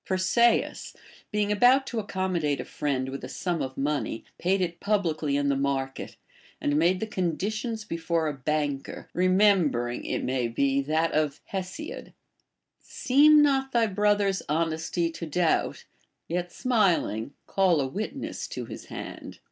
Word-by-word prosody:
Persaeus, 190 +6 +1 0.4
being 210 -1 0
about 250 +6 +5
to 235 -4 -3
accommodate 185 -8 -1
a - - -4
friend 135 -3 -2
with 135 +1 -6
a - - -6
sum 175 -3 -2
of 130 0 -4
money, 140 -4 -2
paid 190 +2 +1
it 175 -2 -2
publicly 160 -8 0
in 145 0 0
the 140 - +2
market, 135 -1 -2 0.4
and 145 - 0
made 175 +4 +3
the 220 - -2
conditions 215 +4 -2
before 165 -3 -1
a 150 - -1
banker, 145 0 -3
remembering, 180 - +2
it - - -2
may 130 -2 0
be, 135 +4 +1
that 155 +4 0
of 150 -1 0
Hesiod, 195 - -6 0.4
— - - -58 0.2
Seem 295 +3 +7
not 270 -2 +1
thy 235 -1 +4
brother's 205 -1 +1
honesty 165 +2 0
to 165 0 -6
doubt; 165 +2 0 0.4
Yet, 175 +1 -2
smiling, 175 - +1
call 185 -5 +2
a 135 - +1
witness 200 +12 -4
to - - -5
liis - - -9
hand. - - -8
170 Hz, 150 wpm, -27 LUFS, 145-205 Hz, 0.4 s, Seem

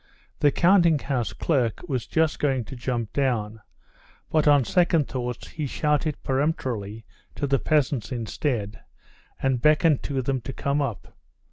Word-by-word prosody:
The 145 - +5
counting 175 -2 +4
house 125 -7 -2
clerk 120 0 -1
was 130 -6 -2
just 160 -1 +1
going 135 -4 +1
to 130 - -9
jump 120 -3 -3
down, 110 -6 -1 0.7
but 155 -1 +2
on 145 -3 +5
second 170 -3 +2
thoughts 125 -2 -5
he 150 -2 -4
shouted 150 +2 0
peremptorily 125 -7 -2 0.3
to 145 - -2
the 135 -1 +1
peasants 145 -5 0
instead, 115 -2 -3 0.6
and 130 -3 +1
beckoned 150 0 +4
to 135 -2 -2
them 130 0 -1
to 135 +3 -6
come 140 +3 -1
up. 115 - -5
135 Hz, 145 wpm, -25 LUFS, 120-150 Hz, 0.7 s, The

